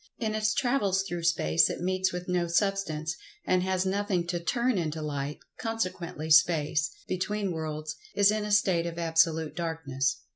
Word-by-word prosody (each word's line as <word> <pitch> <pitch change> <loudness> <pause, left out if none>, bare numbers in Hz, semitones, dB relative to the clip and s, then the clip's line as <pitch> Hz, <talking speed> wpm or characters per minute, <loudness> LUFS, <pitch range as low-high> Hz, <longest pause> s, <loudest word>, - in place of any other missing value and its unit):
In 220 -2 -2
its 215 0 +1
travels 245 -8 +1
through 175 -3 -4
space 165 0 +3
it - - -4
meets 185 +1 0
with 180 0 -5
no 180 -1 0
Substance, 170 -4 0 0.3
and 185 - +2
has 185 0 0
nothing 190 -2 0
to 175 -1 -1
"turn 235 +4 +1
into 160 -1 -2
light"—consequently 160 - -4
Space 155 -1 +4 0.2
(between 200 +1 -1
worlds) 155 -1 -4 0.2
is 200 0 +5
in 215 0 -1
a 210 - -3
state 185 -5 +3
of 170 0 -6
absolute 160 -1 +2
darkness. 140 -6 -2
175 Hz, 155 wpm, -28 LUFS, 160-195 Hz, 0.3 s, is